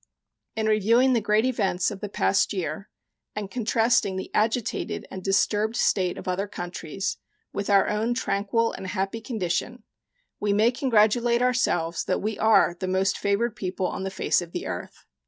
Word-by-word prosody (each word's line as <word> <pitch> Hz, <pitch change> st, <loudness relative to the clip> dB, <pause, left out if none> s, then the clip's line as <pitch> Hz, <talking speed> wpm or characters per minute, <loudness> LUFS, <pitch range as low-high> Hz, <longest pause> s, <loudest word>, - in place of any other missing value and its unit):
In 220 Hz, 0 st, -1 dB
reviewing 225 Hz, +5 st, +4 dB
the 235 Hz, -, +2 dB
great 210 Hz, +2 st, +2 dB
events 205 Hz, -7 st, 0 dB
of 200 Hz, -, -7 dB
the 205 Hz, -, -5 dB
past 95 Hz, -, +1 dB
year 185 Hz, 0 st, -4 dB, 0.5 s
and 205 Hz, -2 st, -5 dB
contrasting 225 Hz, -3 st, +1 dB
the 190 Hz, -, -5 dB
agitated 220 Hz, +2 st, -1 dB
and 190 Hz, -, -6 dB
disturbed 210 Hz, +3 st, +1 dB
state 185 Hz, -6 st, +1 dB
of -, -, -9 dB
other 185 Hz, +3 st, -1 dB
countries 175 Hz, 0 st, -5 dB, 0.4 s
with 200 Hz, +1 st, -3 dB
our 200 Hz, -1 st, +5 dB
own 220 Hz, +3 st, 0 dB
tranquil 230 Hz, 0 st, 0 dB
and 190 Hz, -, -7 dB
happy 195 Hz, +3 st, -3 dB
condition, 220 Hz, +2 st, -3 dB, 0.6 s
we 205 Hz, -1 st, +1 dB
may 215 Hz, +4 st, +4 dB
congratulate 235 Hz, -1 st, +2 dB
ourselves 175 Hz, -10 st, +1 dB
that 185 Hz, -, 0 dB
we 215 Hz, 0 st, -3 dB
are 220 Hz, -5 st, +4 dB
the 185 Hz, -, -3 dB
most 190 Hz, +1 st, +1 dB
favored 205 Hz, +3 st, 0 dB
people 185 Hz, 0 st, -3 dB
on 180 Hz, -, -3 dB
the 190 Hz, -, -2 dB
face 190 Hz, -, +1 dB
of 175 Hz, -1 st, -9 dB
the -, -, -4 dB
earth. -, -, -7 dB
205 Hz, 170 wpm, -25 LUFS, 190-225 Hz, 0.6 s, our